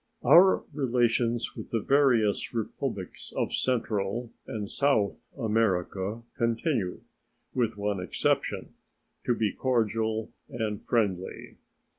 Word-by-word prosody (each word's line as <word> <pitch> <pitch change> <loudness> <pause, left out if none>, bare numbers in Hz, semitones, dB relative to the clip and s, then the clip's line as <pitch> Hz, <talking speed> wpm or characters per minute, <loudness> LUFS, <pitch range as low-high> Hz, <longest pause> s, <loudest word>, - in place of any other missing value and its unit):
Our 190 +3 +7
relations 120 -3 +1
with - - -8
the 115 - 0
various 120 -5 +2
Republics 115 -2 -4
of - - 0
Central 115 -2 -1 0.2
and 105 -2 -4
South 120 -3 0
America 105 -2 0
continue, 115 - 0 0.5
with 115 -4 0
one 100 -1 -1
exception, 90 -1 -1 0.5
to 120 - +2
be 110 -2 0
cordial 110 -3 0 0.2
and 110 -3 -3
friendly. 100 -6 -1
115 Hz, 100 wpm, -28 LUFS, 105-120 Hz, 0.5 s, Our